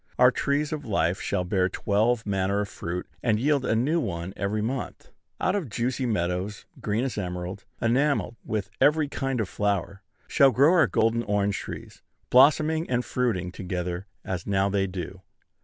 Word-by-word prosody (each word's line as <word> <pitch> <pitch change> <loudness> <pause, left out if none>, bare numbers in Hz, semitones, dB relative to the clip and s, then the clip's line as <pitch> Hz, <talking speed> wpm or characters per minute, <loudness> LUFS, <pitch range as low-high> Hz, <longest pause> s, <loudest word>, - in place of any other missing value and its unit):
Our - - +7
trees 145 +2 0
of 150 -1 -4
life 95 -3 0
shall 90 - -1
bear 90 0 +1
twelve 110 +5 +1
manner 100 0 0
of 100 - -4
fruit, 90 +2 -5 0.2
and 115 -3 +2
yield 140 +1 +2
a 115 - +1
new 145 +9 +2
one 90 - -4
every 105 +2 -1
month. 125 +3 -4 0.3
Out 185 - +1
of 180 -11 -2
juicy 125 +4 -1
meadows 95 -1 -2 0.2
green 105 +3 0
as 130 -5 -2
emerald, 90 +1 -5
enamelled 130 +1 +1
with 110 0 -3
every 150 0 +4
kind 135 -3 -2
of 110 - 0
flower, 100 -1 -1 0.3
shall 140 - +5
grow 140 +7 +5
our 175 -3 +5
golden 115 +1 +2
orange 100 -2 0
trees, - - -8 0.3
blossoming 155 +5 +5
and 125 -1 0
fruiting 105 -8 -1
together 90 0 -4 0.2
as 90 -2 -4
now 100 0 +2
they 100 -1 +1
do. 90 0 -6
105 Hz, 170 wpm, -26 LUFS, 95-130 Hz, 0.3 s, Our